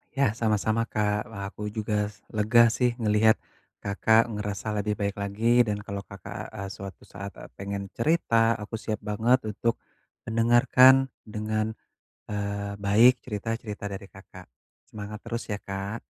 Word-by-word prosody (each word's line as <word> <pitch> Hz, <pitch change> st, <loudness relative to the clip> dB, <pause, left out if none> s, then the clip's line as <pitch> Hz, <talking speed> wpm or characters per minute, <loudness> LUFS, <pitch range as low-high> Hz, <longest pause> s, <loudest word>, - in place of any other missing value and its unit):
Yah 135 Hz, -5 st, +3 dB
sama-sama 110 Hz, 0 st, 0 dB
Kak, 105 Hz, +1 st, 0 dB
wah 110 Hz, -4 st, -7 dB
aku 105 Hz, 0 st, -6 dB
juga 105 Hz, -1 st, -1 dB, 0.2 s
lega 115 Hz, +2 st, +5 dB
sih 125 Hz, -1 st, +1 dB
ngeliat 110 Hz, 0 st, +4 dB, 0.5 s
Kakak 110 Hz, +3 st, +4 dB
ngerasa 105 Hz, 0 st, -4 dB
lebih 105 Hz, +1 st, -1 dB
baik 100 Hz, 0 st, -1 dB
lagi 115 Hz, +5 st, +3 dB
dan 105 Hz, -1 st, 0 dB
kalau 100 Hz, 0 st, -4 dB
Kakak, 100 Hz, 0 st, -8 dB
eee, 100 Hz, 0 st, -5 dB
suatu 95 Hz, 0 st, -9 dB
saat, 100 Hz, 0 st, -7 dB
eee, -, -, -10 dB
pengen 100 Hz, 0 st, -4 dB
cerita, 115 Hz, -5 st, +2 dB
aku 105 Hz, +1 st, -9 dB
siap 110 Hz, 0 st, -3 dB
banget 110 Hz, +5 st, +2 dB
untuk 115 Hz, +3 st, 0 dB, 0.5 s
mendengarkan 120 Hz, +3 st, +5 dB, 0.2 s
dengan, 110 Hz, 0 st, -2 dB, 0.6 s
eee, 100 Hz, 0 st, -3 dB
baik 110 Hz, +5 st, +5 dB
cerita-cerita 105 Hz, -1 st, -4 dB
dari 95 Hz, 0 st, -7 dB
Kakak, 95 Hz, -2 st, -14 dB, 0.4 s
semangat 105 Hz, 0 st, -7 dB
terus 115 Hz, 0 st, -3 dB
ya 105 Hz, -, -1 dB
Kak. 100 Hz, +3 st, -5 dB
105 Hz, 140 wpm, -27 LUFS, 100-115 Hz, 0.6 s, lega